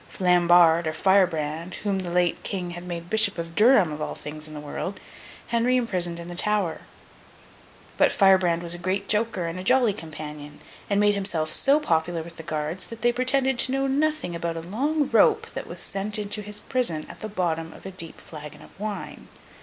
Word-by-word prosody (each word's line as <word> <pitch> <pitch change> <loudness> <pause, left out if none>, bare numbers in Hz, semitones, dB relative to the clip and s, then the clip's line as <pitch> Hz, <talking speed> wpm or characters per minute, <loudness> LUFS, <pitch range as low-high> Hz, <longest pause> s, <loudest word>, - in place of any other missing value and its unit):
Flambard, 175 -2 +4
or 155 - -1
Firebrand, 170 -3 +1
whom 200 -2 0
the 180 -2 -4
late 175 0 +1
King 180 -3 -4
had 175 +1 -8
made 170 -1 -5
Bishop 220 0 +2
of 165 0 -5
Durham, 210 -4 +5
of 150 0 -6
all - - -3
things 155 +1 -7
in 155 - -10
the - - -6
world, 150 +6 -5 0.5
Henry 240 +2 +2
imprisoned 180 -8 0
in 170 - -8
the 175 - -7
Tower; 195 -2 0 1.2
but - - +4
Firebrand 185 -4 +4
was 170 0 -1
a 175 - -6
great 190 +3 -2
joker 210 -4 0
and 165 +2 -4
a - - -6
jolly 245 -1 +3
companion, 150 -2 -9 0.3
and 200 -1 +2
made 205 0 +4
himself 175 -6 -1
so 280 - +4
popular 165 - 0
with 170 0 -11
his 160 - -9
guards 155 +3 -3
that 230 0 -10
they 240 - +5
pretended 255 +1 +1
to 260 - +3
know 270 0 +1
nothing 285 - 0
about 170 0 -3
a - - -4
long 275 - -1
rope - - +4
that - - -6
was - - -7
sent 200 +2 -2
into 210 0 -3
his 210 0 -3
prison 210 -12 -1
at - - -11
the 215 - -6
bottom 165 -5 -2
of - - -15
a 190 - -5
deep 170 -3 -6
flagon 150 -2 -10
of - - -18
wine. 210 0 -6
180 Hz, 200 wpm, -25 LUFS, 165-210 Hz, 1.2 s, Durham